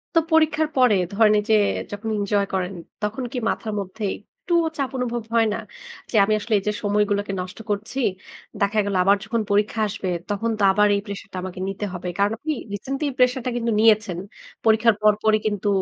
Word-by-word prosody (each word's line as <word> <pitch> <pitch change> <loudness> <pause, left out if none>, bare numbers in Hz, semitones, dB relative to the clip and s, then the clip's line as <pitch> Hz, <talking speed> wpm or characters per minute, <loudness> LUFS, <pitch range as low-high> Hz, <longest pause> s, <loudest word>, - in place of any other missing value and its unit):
তো - - +7
পরীক্ষার 315 -1 +3
পরে 250 -5 +5 0.2
ধরেন, 215 +1 +5
এইযে 215 +1 +2 0.4
যখন 205 +2 -5
এঞ্জয় 200 0 +1
করেন, 190 0 -1 0.3
তখন 220 +5 -2
কি 260 - -4
মাথার 215 -2 -3
মধ্যে 200 +3 -6
একটুও 340 - -1
চাপ 275 -2 -1
অনুভব 240 -2 -2
হয় 230 -1 +4
না? - - -3 0.5
যে, - - -4
আমি 215 +2 +2
আসলে 220 +1 -3
এইযে 210 +2 -1
সময়গুলোকে 205 -1 +1
নষ্ট 185 +4 -8
করছি, 210 +6 -2 0.6
দেখা 205 +2 +2
গেলো 200 -2 0
আবার 200 +2 +4
যখন 225 +1 -1
পরীক্ষা 210 +2 +1
আসবে, 190 -1 -4 0.2
তখন 225 +3 -1
তো - - +1
আবার 210 +1 +4
এই 200 - -1
প্রেশারটা 200 -1 -7
আমাকে 185 0 -6
নিতে 195 +1 -3
হবে? 180 0 -5
কারণ, 200 +1 +3
আপনি 310 +5 -2 0.2
রিসেন্টলি 270 +8 -3
এই - - -6
প্রেশারটা 250 0 +2
কিন্তু 230 -1 -1
নিয়েছেন। 215 -5 +4 0.5
পরীক্ষার 220 0 +4
পর, 215 0 +6
পরই 215 0 +4
কিন্তু 205 -1 -2
210 Hz, 185 wpm, -23 LUFS, 200-230 Hz, 0.6 s, তো